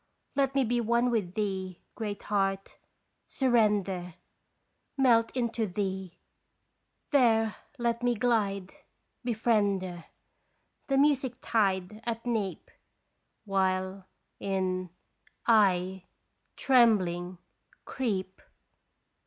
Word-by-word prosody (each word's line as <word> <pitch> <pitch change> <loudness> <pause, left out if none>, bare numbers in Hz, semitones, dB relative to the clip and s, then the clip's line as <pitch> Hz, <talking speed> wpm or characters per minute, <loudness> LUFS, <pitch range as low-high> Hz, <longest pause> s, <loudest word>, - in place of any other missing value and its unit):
Let 275 -1 +1
me 270 - +4
be 240 0 0
one 235 +2 +2
with 200 -6 -1
thee, 190 -4 -3
Great 210 -3 -5
Heart 195 -1 -1 0.5
surrender 205 - +1 0.8
Melt 235 -4 +4
into 230 -2 0
thee 190 -1 -4 0.9
there 225 -6 +3 0.2
let 235 -1 -1
me 245 0 +2
glide 205 -5 0 0.5
Befriender! 205 -7 0 0.8
The 275 - +1
music 275 -3 +2
tide 200 -1 0
at 230 0 -4
neap 220 -6 -2 0.7
While 190 -1 -1 0.3
in 185 -2 -1 0.6
I 190 -4 +3 0.5
trembling 185 -9 +3 0.5
creep 190 -7 -3
210 Hz, 85 wpm, -29 LUFS, 190-235 Hz, 0.9 s, me